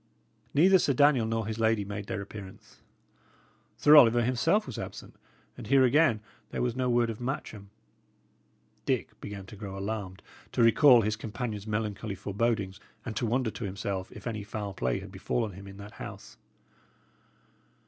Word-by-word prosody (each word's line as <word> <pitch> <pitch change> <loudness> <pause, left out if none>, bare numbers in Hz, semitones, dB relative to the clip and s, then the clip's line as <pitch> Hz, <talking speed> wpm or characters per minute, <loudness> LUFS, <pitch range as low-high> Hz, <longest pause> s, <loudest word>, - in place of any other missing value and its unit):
Neither 185 +6 +6
Sir 140 - +2
Daniel 135 -4 +4
nor 115 -1 -1
his 110 +1 -4
lady 110 -2 +2
made 100 0 -6
their 100 - -3
appearance. 100 -1 -12 1.0
Sir 150 +1 +7
Oliver 120 -4 +7
himself 130 - +2
was 130 - -6
absent, - - -8 0.4
and - - -9
here 135 -1 +5
again 130 -4 +4 0.3
there - - -2
was 120 -1 -1
no 130 -1 0
word 120 -1 +2
of 110 - -9
Matcham. 110 -6 -5 1.2
Dick - - 0
began 100 -2 -7
to 95 - -11
grow 100 -2 -7
alarmed, 100 -2 -5 0.3
to 120 - +3
recall 120 +2 +7
his 105 +1 0
companion's 110 -1 -5
melancholy 105 -1 -3
forebodings, 100 -1 -1 0.3
and 115 - -5
to 120 - -1
wonder 120 0 0
to 115 - -7
himself 95 -1 -4
if - - -11
any 110 -3 -3
foul 105 -1 -5
play 65 -9 -1
had 95 0 -10
befallen 105 +3 -2
him 100 +2 -11
in 100 0 -11
that 100 +1 -10
house. - - -9
110 Hz, 165 wpm, -29 LUFS, 100-120 Hz, 1.2 s, Sir